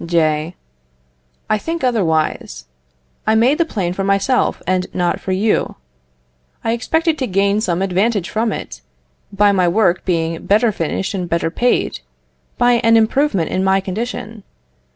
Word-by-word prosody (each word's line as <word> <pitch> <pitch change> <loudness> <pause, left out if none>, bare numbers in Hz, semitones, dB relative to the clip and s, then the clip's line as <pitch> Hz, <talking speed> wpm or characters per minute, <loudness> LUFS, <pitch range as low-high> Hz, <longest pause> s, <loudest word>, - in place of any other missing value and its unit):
J. 160 0 0 0.9
I 215 - +1
think 330 +5 -4
otherwise. 165 - 0 0.6
I 220 - +4
made 250 +8 +3
the 335 - +3
plane 190 - -2
for 195 - -3
myself, 200 +6 +1
and 185 0 0
not 180 +1 0
for 190 - -4
you. 205 +4 0 0.9
I 225 - 0
expected 320 +7 0
to 260 - -1
gain 200 +2 +1
some 180 -2 0
advantage 195 +1 0
from 220 +1 -1
it, 60 - -7 0.5
by 205 0 +3
my 185 -3 +2
work 180 -1 +2
being 165 -2 -1
better 215 +3 +3
finished 190 +2 -3
and 180 -3 -3
better 170 -1 0
paid, 245 +7 0 0.6
by 245 -1 +3
an 230 0 +5
improvement 225 - +1
in 185 - 0
my 190 0 +3
condition. 215 +2 -5
200 Hz, 150 wpm, -18 LUFS, 180-230 Hz, 0.9 s, an